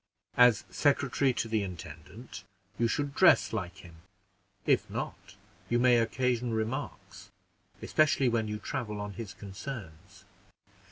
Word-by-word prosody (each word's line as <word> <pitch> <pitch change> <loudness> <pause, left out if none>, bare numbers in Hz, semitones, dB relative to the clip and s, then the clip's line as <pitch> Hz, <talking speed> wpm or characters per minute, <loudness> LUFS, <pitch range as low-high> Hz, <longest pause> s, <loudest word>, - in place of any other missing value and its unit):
As 125 -2 +6
secretary 140 -2 +2
to 115 - -2
the 110 -1 0
intendant, 90 +5 -8 0.4
you 115 - +3
should 145 +4 -1
dress - - +5
like 90 0 -5
him; 85 -2 -14 0.7
if - - +2
not, - - -6 0.3
you 120 - +2
may 125 0 +5
occasion 120 0 0
remarks, 110 +4 -4 0.5
especially 150 -3 +3
when 115 -2 +1
you 105 0 -3
travel 105 -1 -4
on 105 0 -5
his 110 -2 -7
concerns." 100 - -9
115 Hz, 125 wpm, -30 LUFS, 100-125 Hz, 0.7 s, As